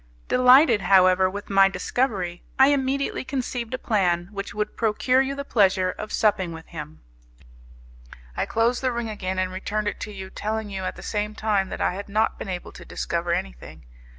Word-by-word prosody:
Delighted, 250 -2 +6
however, 185 0 +5
with 205 +2 -7
my 195 0 +6
discovery, 185 -2 -2 0.2
I 265 +1 +7
immediately 275 -1 0
conceived 255 -2 -3
a - - -4
plan 180 -7 0
which 200 -1 -5
would 210 +1 -3
procure 235 +4 +2
you 270 +1 -2
the 280 0 -5
pleasure 190 -6 +2
of 215 +2 -8
supping 205 -5 +1
with 160 0 -10
him. 155 -2 -9 1.3
I - - -1
closed 230 +2 +1
the 260 -1 +1
ring 235 -1 -3
again 190 -3 -4
and 185 0 0
returned 205 +3 -3
it - - -3
to 210 - -6
you, 190 -2 -8
telling 215 0 -3
you 190 -1 -4
at - - -3
the - - -11
same 210 0 -3
time 205 -4 0
that - - -5
I - - +1
had 200 +2 -7
not 215 +2 0
been - - -6
able 180 -1 -5
to 175 - -12
discover 170 0 -3
anything. 60 - -5
205 Hz, 190 wpm, -24 LUFS, 185-235 Hz, 1.3 s, I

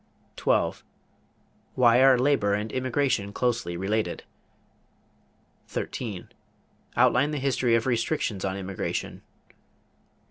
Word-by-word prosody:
12. - - 0 0.9
Why 120 0 +5
are 135 -1 +6
labor 125 -6 +2
and 105 +1 -4
immigration 130 -5 0
closely 115 -7 -1
related? 105 +4 -2 1.4
13. 105 -7 -5 0.7
Outline 130 +4 +4
the 150 - -3
history 130 -3 +1
of 115 - 0
restrictions 115 -4 -1
on 95 0 -2
immigration. 95 -1 -4
120 Hz, 95 wpm, -26 LUFS, 100-130 Hz, 1.4 s, are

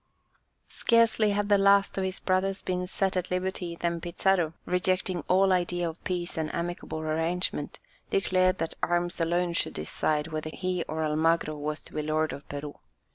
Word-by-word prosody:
Scarcely 230 -2 +3
had 205 0 0
the 205 -1 +4
last 200 0 +4
of 195 - -1
his 190 0 -3
brothers 190 +1 0
been 180 0 -2
set 190 +1 0
at 185 -1 -1
liberty 180 -1 -2
than 170 0 -2
Pizarro, 175 -1 +1
rejecting 180 -1 +1
all 190 +1 +4
idea 175 -1 +1
of 165 0 -8
peace 175 -2 -2
and 155 - -2
amicable 170 -2 -4
arrangement, 165 +3 -1 0.3
declared 185 -1 +2
that 165 - -3
arms 175 0 0
alone 175 +1 +1
should - - 0
decide 150 - -1
whether 155 -1 -4
he 185 0 -2
or 160 0 -2
Almagro 155 0 +1
was 150 +1 -4
to - - -15
be 155 - -1
lord 155 +1 0
of 140 - -10
Peru. 145 0 -6
175 Hz, 170 wpm, -28 LUFS, 160-185 Hz, 0.3 s, the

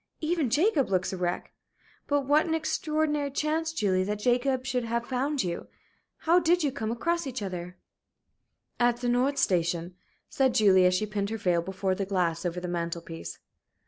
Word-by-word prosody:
Even 315 -4 0
Jacob 295 - +2
looks 185 0 0
a - - -3
wreck. 175 0 -3 0.5
But 285 0 +2
what 290 +4 +3
an 320 - +1
extraordinary 310 -2 0
chance, 310 +3 -1
Julie, 195 -11 +1
that 210 +1 -2
Jacob 250 +3 +1
should 250 -2 -1
have 235 +1 -1
found 270 +2 -1
you! 170 -2 -4 0.6
How 340 +3 +5
did 350 0 +2
you 285 - +1
come 220 -5 -4
across 335 +8 -1
each 250 -4 -4
other?" 180 -1 -6 1.0
"At 240 -1 +3
the 245 - 0
Nord 255 +4 +2
Station," 170 -1 0 0.3
said 265 -2 +1
Julie, 190 -4 +6
as 180 - +2
she 215 - 0
pinned 205 -1 -2
her 225 - -3
veil 180 -4 +1
before 190 +1 -2
the 195 +1 -3
glass 175 -3 0
over 175 +1 -3
the 180 - -5
mantel 170 -1 -3
piece. 165 -1 -8
235 Hz, 180 wpm, -28 LUFS, 185-290 Hz, 1.0 s, Julie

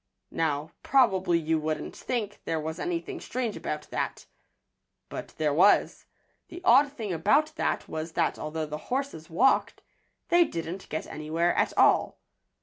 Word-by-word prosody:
Now, 155 -1 -1
probably 190 -10 +3
you 160 -1 0
wouldn't 155 0 -3
think 210 -5 -3
there 160 - -1
was 160 +2 -5
anything 355 +2 -3
strange 245 -4 -3
about 150 0 -4
that. - - -3 0.8
But - - -7
there 150 -2 +1
was. 180 +7 +3 0.4
The 350 - -8
odd 280 -1 +6
thing 220 -9 -4
about 280 - +2
that - - -1
was 160 +1 -5
that - - 0
although 155 +1 -3
the 150 0 -6
horses 260 - -3
walked, 215 +12 +2 0.5
they 345 0 +6
didn't 170 - -5
get 155 - -3
anywhere 160 +3 -1
at - - +1
all. - - +4
170 Hz, 145 wpm, -28 LUFS, 155-255 Hz, 0.8 s, odd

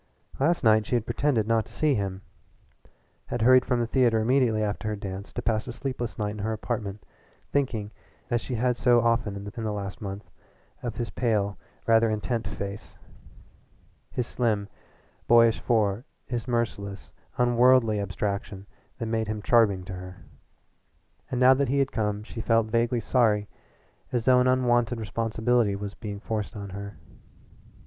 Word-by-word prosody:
Last 160 +4 +2
night 110 -2 +4
she - - 0
had 115 -2 0
pretended 120 -2 +1
not 115 -1 +2
to - - -14
see 155 -2 +2
him 95 -4 -3 1.0
had 115 - -2
hurried 130 +1 +6
from 125 - +1
the 120 - +1
theatre 120 -1 +3
immediately 115 -2 +2
after 105 +1 -2
her 105 - -1
dance 100 -1 -7
to - - -4
pass 110 -1 0
a - - -4
sleepless 120 -4 -4
night 105 -1 -1
in 105 - -7
her 110 +2 -1
apartment, 105 -2 -4 0.5
thinking 115 -7 -1 0.4
as 120 -1 +1
she 125 - -4
had 125 +1 +1
so 120 -1 +4
often 115 -3 +1
in 100 - -6
the 110 +2 -4
last 100 -2 -5
month 100 0 -7 0.5
of 120 -3 -4
his 120 - -4
pale, 105 -5 0 0.3
rather 115 0 +4
intent 110 0 -2
face, 100 +1 -7 1.1
his 125 - -2
slim, 110 -5 -1 0.6
boyish 115 -1 +5
fore, 110 -2 +1 0.2
the 120 -2 -2
merciless, 100 -7 -3 0.2
unworldly 120 -2 +4
abstraction 100 0 -3 0.3
that 115 - -4
made 110 -1 -1
him 110 0 -3
charming 105 -4 +3
to 95 - -7
her. 90 0 -8 1.1
And 125 - -2
now 130 +1 +7
that 135 -1 0
he 140 - +1
had 135 -1 +1
come 105 -2 -1
she 115 - -7
felt 115 -1 +3
vaguely 120 0 +1
sorry 105 -5 +2 0.6
as 120 -3 -1
though 130 -1 +6
an 125 - +3
unwonted 120 -2 +2
responsibility 115 0 0
was 100 0 -5
being 105 -2 -7
forced 110 -1 -4
on 100 -2 -7
her. 100 +1 -7
115 Hz, 165 wpm, -26 LUFS, 105-120 Hz, 1.1 s, now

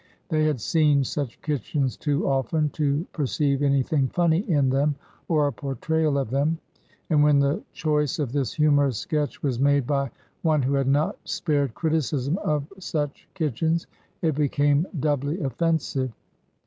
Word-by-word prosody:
They 155 -2 +2
had 150 -5 +1
seen 145 +2 +3
such 135 -2 -4
kitchens 140 -2 -1
too 145 -2 -1
often 140 +3 +1
to 150 +2 0
perceive 140 -1 0
anything 140 0 +2
funny 170 +2 +2
in 140 -5 +3
them 140 +2 +2 0.3
or 155 -3 +3
a 145 - 0
portrayal 145 +5 -1
of 135 -5 -2
them. 145 +5 +1 0.5
And 150 -2 +5
when 150 -1 +5
the 140 +7 +2
choice 150 -2 0
of 145 -6 -2
this 135 -6 -1
humorous 145 -4 +3
sketch 150 +1 -2
was 130 -4 0
made 140 -1 +3
by 140 0 0 0.3
one 155 -4 +2
who 135 +2 +1
had 135 -1 +1
not 145 +3 +1
spared 145 -7 -1
criticism 155 - 0
of 150 -2 -1
such 150 -6 -4
kitch 155 -10 -2
ens, 165 +1 +1 0.4
it 160 -2 +2
became 145 +2 +2
doubly 145 +3 0
offensive. 140 -3 -1
145 Hz, 155 wpm, -25 LUFS, 140-155 Hz, 0.5 s, And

